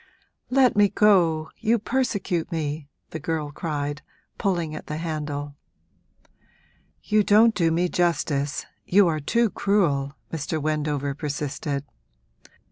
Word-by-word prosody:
'Let 255 -2 +4
me 205 -1 +5
go 170 -8 +3
you 230 +1 +2
persecute 200 -8 -1
me!' 150 -2 -3 0.2
the 160 - -5
girl 155 -1 -3
cried, 145 -2 -3 0.4
pulling 170 -5 0
at 155 - -8
the 150 - -4
handle. 150 -3 -4 1.5
'You 215 0 +3
don't 220 +3 +5
do 170 -5 +2
me 170 +2 +1
justice 150 -5 0 0.2
you 195 0 +4
are 155 -2 0
too 230 +9 +1
cruel!' 150 -9 +1 0.2
Mr. 155 0 -2
Wendover 150 -2 -1
persisted. 145 0 -3
160 Hz, 120 wpm, -24 LUFS, 145-195 Hz, 1.5 s, me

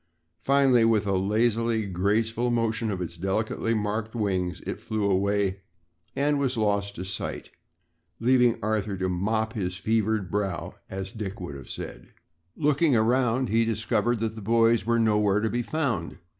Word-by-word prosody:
Finally, 135 -3 +4
with 110 -3 +3
a 100 - 0
lazily 110 +3 +1
graceful 110 +6 0
motion 115 -2 0
of 95 -3 -2
its 85 -1 -7
delicately 110 +5 -1
marked 110 +2 -2
wings, 95 -5 -1
it - - -4
flew 110 -1 -3
away 100 0 +1 0.6
and 145 +1 +1
was 130 -3 0
lost 100 -2 0
to 90 - -5
sight, 95 - -4 0.7
leaving 125 0 +4
Arthur 105 -2 -1
to 95 0 -1
"mop 110 +5 -1
his 90 -4 -3
fevered 110 -3 0
brow," 100 -4 -2 0.2
as 95 0 -5
Dick 105 -1 -6
would 90 -5 -6
have 70 -2 -10
said. - - -7 0.5
Looking 150 -1 +2
around 120 +2 +2
him 110 - -1
he 115 - +4
discovered 115 +1 0
that 110 -1 -1
the 110 - -8
boys 115 0 +3
were 115 0 +3
nowhere 105 -3 +3
to 110 +1 -1
be 120 - 0
found. 120 - -2
110 Hz, 160 wpm, -26 LUFS, 100-115 Hz, 0.7 s, Finally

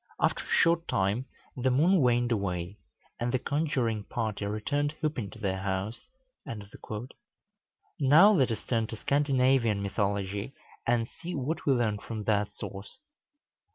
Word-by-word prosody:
After - - +1
a - - -13
short 165 0 +3
time 100 +7 0 0.3
the 130 0 +1
moon 160 +8 +4
waned 120 -1 +3
away, 95 -3 -2 0.4
and 120 +1 0
the 130 - +2
conjuring 130 -7 -1
party 110 -4 -3
returned 145 +8 -1
whooping 145 -10 -2
to - - -12
their 95 -3 -2
house." 95 - -3 1.9
Now 155 +9 +7
let 135 - +3
us 110 -3 -3
turn 115 -3 0
to 115 - -6
Scandinavian 130 -5 +2
mythology, 100 +3 -2 0.3
and 115 -1 +2
see 170 +5 -7
what 150 +4 -3
we 140 - +6
learn 110 -4 +1
from 110 0 -6
that 105 -1 +1
source. 100 0 -8
120 Hz, 140 wpm, -29 LUFS, 105-140 Hz, 1.9 s, Now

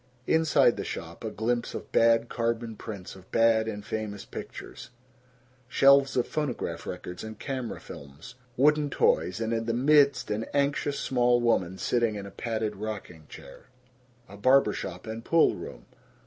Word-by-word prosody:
Inside 145 -6 +3
the - - -3
shop, - - -7
a - - -2
glimpse 120 +2 -2
of - - -7
bad 115 0 +4
carbon 115 -1 -2
prints 100 -5 -8
of 95 -1 -16
bad 115 -1 +3
and 105 -2 -5
famous 105 -2 -4
pictures, - - -9 0.8
shelves 135 +1 +5
of 125 - +1
phonograph 125 - -3
records 90 0 -6
and 110 -1 -8
camera 130 -2 -4
films, 70 - -11 0.2
wooden 150 +2 +3
toys, 90 -7 +1
and 115 0 -1
in 115 0 -1
the 115 - 0
midst 140 -1 +4
an 110 +2 -1
anxious 140 0 +1
small 125 -1 +2
woman 95 -6 +1
sitting 115 -1 0
in 100 -1 -6
a 100 - -9
padded 110 -3 -3
rocking 100 -7 -7
chair. - - -13 0.6
A 100 - -12
barber 130 0 +4
shop 90 0 -6
and 110 +1 -6
pool 165 +4 +4
room. - - -9
115 Hz, 160 wpm, -27 LUFS, 105-130 Hz, 0.8 s, shelves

